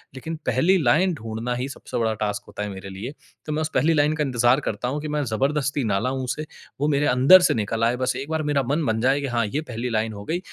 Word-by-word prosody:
लेकिन 160 Hz, +5 st, -5 dB
पहली 165 Hz, +11 st, +3 dB
लाइन 165 Hz, +9 st, +3 dB
ढूँढना 115 Hz, -2 st, -4 dB
ही 125 Hz, +3 st, -3 dB
सबसे -, -, -6 dB
बड़ा 115 Hz, -2 st, +1 dB
टास्क 105 Hz, 0 st, -3 dB
होता 105 Hz, -, -6 dB
है 105 Hz, -, -4 dB
मेरे 95 Hz, 0 st, -8 dB
लिए। 100 Hz, +8 st, -6 dB, 0.3 s
तो 155 Hz, -, -4 dB
मैं 155 Hz, -, -1 dB
उस 155 Hz, -, -1 dB
पहली 155 Hz, +6 st, +3 dB
लाइन 150 Hz, 0 st, +3 dB
का 150 Hz, -, 0 dB
इंतजार 125 Hz, -1 st, +3 dB
करता 110 Hz, +4 st, -3 dB
हूँ 145 Hz, +4 st, -2 dB
कि 155 Hz, -, -5 dB
मैं 150 Hz, -1 st, -1 dB
जबरदस्ती 140 Hz, +2 st, 0 dB
ना 100 Hz, -, +2 dB
लाऊँ 130 Hz, +3 st, -2 dB
उसे 150 Hz, +5 st, -3 dB, 0.4 s
वो 145 Hz, -, +2 dB
मेरे 145 Hz, 0 st, +2 dB
अंदर 135 Hz, +8 st, +7 dB
से -, -, +4 dB
निकल 110 Hz, +1 st, -1 dB
आए 115 Hz, +2 st, +3 dB
बस 130 Hz, -, 0 dB
एक 140 Hz, +3 st, -5 dB
बार 160 Hz, -1 st, -1 dB
मेरा 140 Hz, -2 st, +2 dB
मन 145 Hz, +5 st, 0 dB
बन 110 Hz, -2 st, 0 dB
जाए 135 Hz, +2 st, +3 dB
कि 140 Hz, -, -2 dB
हाँ 120 Hz, -3 st, 0 dB
ये 140 Hz, +9 st, -2 dB
पहली 125 Hz, -4 st, -4 dB
लाइन 110 Hz, -1 st, -1 dB
हो 100 Hz, 0 st, -8 dB
गई। 170 Hz, +8 st, -1 dB
130 Hz, 270 wpm, -23 LUFS, 115-150 Hz, 0.4 s, अंदर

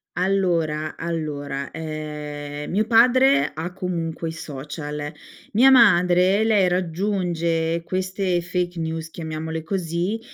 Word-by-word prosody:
Allora, 170 Hz, -5 st, 0 dB
allora, 145 Hz, -4 st, -4 dB
ehm, 150 Hz, -2 st, -6 dB
mio 215 Hz, +4 st, +1 dB
padre 245 Hz, -, +5 dB
ha 165 Hz, +4 st, -5 dB
comunque 170 Hz, -3 st, -3 dB
i -, -, -4 dB
social, 150 Hz, 0 st, -6 dB, 0.4 s
mia 250 Hz, +6 st, +6 dB
madre, 185 Hz, -5 st, +5 dB
lei 210 Hz, -4 st, +3 dB
raggiunge 170 Hz, -2 st, -1 dB
queste 185 Hz, 0 st, -1 dB
fake 175 Hz, 0 st, -2 dB
news 160 Hz, 0 st, -4 dB
chiamiamole 160 Hz, 0 st, -5 dB
così. 175 Hz, +4 st, -2 dB
170 Hz, 105 wpm, -23 LUFS, 155-185 Hz, 0.4 s, mia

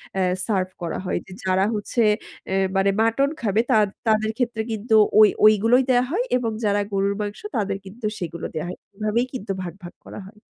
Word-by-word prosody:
অ্যা 190 Hz, -, +1 dB, 0.2 s
serve 190 Hz, -4 st, 0 dB
করা 170 Hz, -, -3 dB
হয়। -, -, -1 dB
যে 190 Hz, -, -15 dB
যারা 190 Hz, +1 st, +2 dB
হচ্ছে 210 Hz, +3 st, -1 dB, 0.5 s
এ -, -, 0 dB, 0.2 s
মানে 195 Hz, +1 st, +3 dB
মাটন 230 Hz, +5 st, +2 dB
খাবে 215 Hz, 0 st, +2 dB
তাদ 210 Hz, -2 st, +4 dB, 0.2 s
তাদের 220 Hz, 0 st, +2 dB
ক্ষেত্রে 235 Hz, -3 st, -1 dB
কিন্তু 220 Hz, +1 st, -2 dB, 0.3 s
ওই, 215 Hz, -1 st, +8 dB, 0.2 s
ওইগুলোই 225 Hz, +5 st, +5 dB
দেয়া 245 Hz, 0 st, +4 dB
হয় 450 Hz, +8 st, +1 dB
এবং 230 Hz, -2 st, -2 dB
যারা 205 Hz, 0 st, +2 dB
গরুর 200 Hz, +1 st, +1 dB
মাংস 205 Hz, 0 st, -4 dB, 0.2 s
তাদের 200 Hz, -2 st, -1 dB
কিন্তু 215 Hz, +4 st, -9 dB
সেগুলো 170 Hz, -1 st, -5 dB
দেয়া 155 Hz, -, -3 dB
হয়। -, -, -7 dB, 0.2 s
এভাবেই 215 Hz, +3 st, 0 dB
কিন্তু 215 Hz, -5 st, -5 dB
ভাগ, 175 Hz, -2 st, -6 dB
ভাগ 175 Hz, -, -9 dB
করা -, -, -8 dB
হয়। 210 Hz, +1 st, -16 dB
210 Hz, 195 wpm, -23 LUFS, 195-225 Hz, 0.5 s, ওই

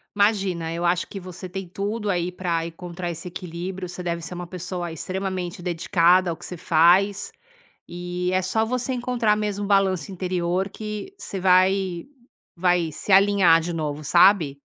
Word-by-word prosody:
Imagina 195 Hz, -6 st, +1 dB
eu 170 Hz, +1 st, -3 dB
acho 175 Hz, 0 st, +1 dB
que 195 Hz, -, -8 dB
você 185 Hz, 0 st, -8 dB
tem 190 Hz, 0 st, -6 dB
tudo 205 Hz, +3 st, -3 dB
aí 180 Hz, 0 st, -1 dB
pra 170 Hz, -3 st, -2 dB
encontrar 175 Hz, +1 st, -6 dB
esse 170 Hz, +2 st, -6 dB
equilíbrio. 180 Hz, +1 st, -6 dB
Você 180 Hz, +1 st, -6 dB
deve 170 Hz, -1 st, -3 dB
ser 165 Hz, +2 st, -6 dB
uma 175 Hz, 0 st, -6 dB
pessoa 180 Hz, -1 st, -5 dB
extremamente 185 Hz, +1 st, -4 dB
dedicada 175 Hz, +1 st, +3 dB
ao 165 Hz, -, -3 dB
que 175 Hz, -, -12 dB
você 180 Hz, -, -6 dB
faz 180 Hz, +5 st, +3 dB, 0.6 s
e 175 Hz, +1 st, -3 dB
é 185 Hz, -, +2 dB
só 205 Hz, +4 st, +1 dB
você 250 Hz, +3 st, -2 dB
encontrar 240 Hz, -4 st, +1 dB
mesmo 205 Hz, -1 st, -2 dB
o -, -, -4 dB
balanço 195 Hz, -3 st, +2 dB
interior 180 Hz, 0 st, -1 dB
que 210 Hz, -, -6 dB
você 195 Hz, -, -5 dB
vai 185 Hz, -1 st, +3 dB, 0.5 s
vai 175 Hz, -2 st, +1 dB
se 200 Hz, -, -6 dB
alinhar 195 Hz, -3 st, +6 dB
de 170 Hz, +1 st, -4 dB
novo, 150 Hz, -2 st, -3 dB
sabe. 170 Hz, -4 st, +4 dB
180 Hz, 165 wpm, -24 LUFS, 170-195 Hz, 0.6 s, alinhar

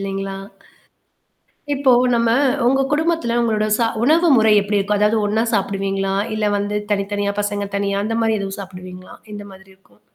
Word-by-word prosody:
இல்லேங்களா! 195 Hz, 0 st, -4 dB, 1.4 s
இப்போ 270 Hz, -1 st, +2 dB, 0.2 s
நம்ம, 230 Hz, 0 st, +1 dB, 0.4 s
உங்க 270 Hz, +1 st, +2 dB
குடும்பத்துல 320 Hz, -6 st, 0 dB
உங்களோட 215 Hz, -2 st, 0 dB
சா 230 Hz, -, +1 dB, 0.2 s
உணவு 330 Hz, +6 st, +3 dB
முறை 220 Hz, -1 st, +4 dB
எப்பிடி 205 Hz, 0 st, -1 dB
இருக்கும்? 205 Hz, +1 st, -1 dB
அதாவது 210 Hz, +2 st, +2 dB
ஒண்ணா 215 Hz, +2 st, 0 dB
சாப்பிடுவீங்களா? 195 Hz, -1 st, -1 dB, 0.2 s
இல்ல 210 Hz, -1 st, 0 dB
வந்து 205 Hz, +1 st, -2 dB
தனித்தனியா, 200 Hz, 0 st, -1 dB
பசங்க 205 Hz, -1 st, -3 dB
தனியா 200 Hz, 0 st, -1 dB
அந்தமாரி 225 Hz, 0 st, 0 dB
எதுவும் 195 Hz, 0 st, -5 dB
சாப்பிடுவீங்களா? 185 Hz, -1 st, -10 dB, 0.2 s
எந்தமாதிரி 195 Hz, -2 st, -11 dB
இருக்கும்? 190 Hz, -, -30 dB
205 Hz, 140 wpm, -19 LUFS, 195-225 Hz, 1.4 s, முறை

